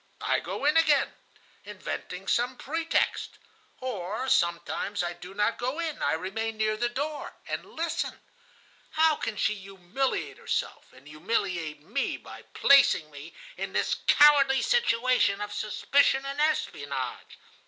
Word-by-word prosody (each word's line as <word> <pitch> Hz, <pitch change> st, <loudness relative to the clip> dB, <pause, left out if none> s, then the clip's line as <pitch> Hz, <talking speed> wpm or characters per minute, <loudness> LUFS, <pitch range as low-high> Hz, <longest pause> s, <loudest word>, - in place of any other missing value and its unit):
I -, -, +1 dB
go -, -, -5 dB
in 300 Hz, +2 st, +4 dB
again, 305 Hz, -4 st, +3 dB, 0.5 s
inventing -, -, -6 dB
some 245 Hz, +2 st, +1 dB
pretext. 325 Hz, +3 st, -1 dB, 0.4 s
Or 220 Hz, 0 st, -3 dB
sometimes 170 Hz, +2 st, 0 dB
I 175 Hz, 0 st, -2 dB
do 180 Hz, +2 st, -11 dB
not 210 Hz, +2 st, 0 dB
go 255 Hz, +5 st, -2 dB
in; 330 Hz, -3 st, -3 dB
I -, -, +1 dB
remain 215 Hz, +7 st, -3 dB
near 215 Hz, 0 st, +1 dB
the 240 Hz, +2 st, 0 dB
door, 290 Hz, +4 st, -4 dB
and -, -, -3 dB
listen. 330 Hz, 0 st, -2 dB, 0.7 s
How 315 Hz, 0 st, +3 dB
can 215 Hz, -, -4 dB
she 215 Hz, -, +1 dB
humiliate 195 Hz, +6 st, -3 dB
herself -, -, -3 dB
and 130 Hz, +2 st, -18 dB
humiliate 160 Hz, -2 st, -2 dB
me -, -, -2 dB
by -, -, -12 dB
placing 225 Hz, -, +5 dB
me 145 Hz, +3 st, -11 dB, 0.2 s
in -, -, -4 dB
this -, -, +1 dB
cowardly 285 Hz, -2 st, +6 dB
situation 255 Hz, -, +2 dB
of 205 Hz, 0 st, -5 dB
suspicion 270 Hz, +6 st, +2 dB
and 275 Hz, +2 st, -3 dB
espionage? 310 Hz, 0 st, -2 dB
230 Hz, 135 wpm, -28 LUFS, 190-280 Hz, 0.7 s, cowardly